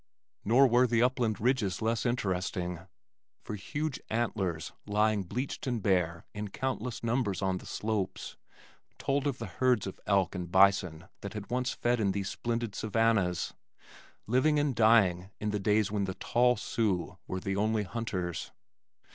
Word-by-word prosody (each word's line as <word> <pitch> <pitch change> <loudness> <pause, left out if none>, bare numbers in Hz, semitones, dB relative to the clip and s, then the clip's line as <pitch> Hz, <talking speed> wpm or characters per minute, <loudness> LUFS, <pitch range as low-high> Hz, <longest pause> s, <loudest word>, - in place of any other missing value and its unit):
Nor 125 +6 +5
were 125 0 +4
the 115 0 +3
upland 120 -5 +1
ridges 110 -6 +1
less 115 0 0
interesting, 90 -5 -2 0.6
for - - -6
huge 145 +9 -3
antlers 100 -8 -1 0.2
lying 105 0 +2
bleached 125 +9 -4
and 120 -2 0
bare 90 -4 +1
in 105 0 -4
countless 125 +2 -3
numbers 115 -5 0
on 95 -1 0
the - - -12
slopes 105 -3 -3 0.6
told 140 +1 0
of 135 -3 -1
the 115 - -5
herds 120 +4 +1
of 95 - -7
elk 100 -4 +2
and 90 -2 -5
bison 95 -4 +3
that 100 - -6
had 105 +1 -7
once 125 +1 0
fed 120 0 0
in 100 -3 +1
these 100 -1 -2
splendid 115 -2 -2
savannahs, 110 -5 +1 0.7
living 130 +7 +3
and 145 -2 +1
dying 100 -5 +4
in 105 0 -1
the 105 - -1
days 105 +1 +2
when 100 -2 0
the 95 -1 -4
tall 125 0 +2
Sioux 95 -4 -1
were 95 - -3
the 95 +1 -2
only 105 +1 +1
hunters. 95 -5 -3
105 Hz, 155 wpm, -30 LUFS, 95-120 Hz, 0.7 s, Nor